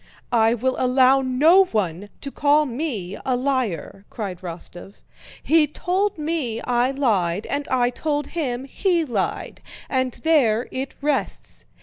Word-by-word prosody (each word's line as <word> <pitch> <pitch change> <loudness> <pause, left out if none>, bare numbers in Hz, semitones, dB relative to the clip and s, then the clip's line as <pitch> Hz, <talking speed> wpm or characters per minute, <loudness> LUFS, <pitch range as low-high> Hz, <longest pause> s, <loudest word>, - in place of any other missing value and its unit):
"I 225 0 +4
will 255 +3 -1
allow 260 +1 +4
no 305 +9 +5
one 205 - -2
to 275 - -6
call 295 +2 +3
me 235 - -4
a 255 - 0
liar!" 245 - -2
cried 195 -6 -5
Rostóv. 175 +2 -9 0.5
"He 315 -1 +4
told 370 +6 -1
me 300 -7 -2
I 245 0 +1
lied, 210 -9 0
and 285 0 -3
I 245 -1 +1
told 295 +2 -2
him 265 -6 -2
he 340 +3 0
lied. 225 -8 -3 0.3
And 260 -2 0
there 255 -8 +3
it 265 +1 -5
rests. 290 -1 -2
260 Hz, 135 wpm, -22 LUFS, 220-295 Hz, 0.5 s, no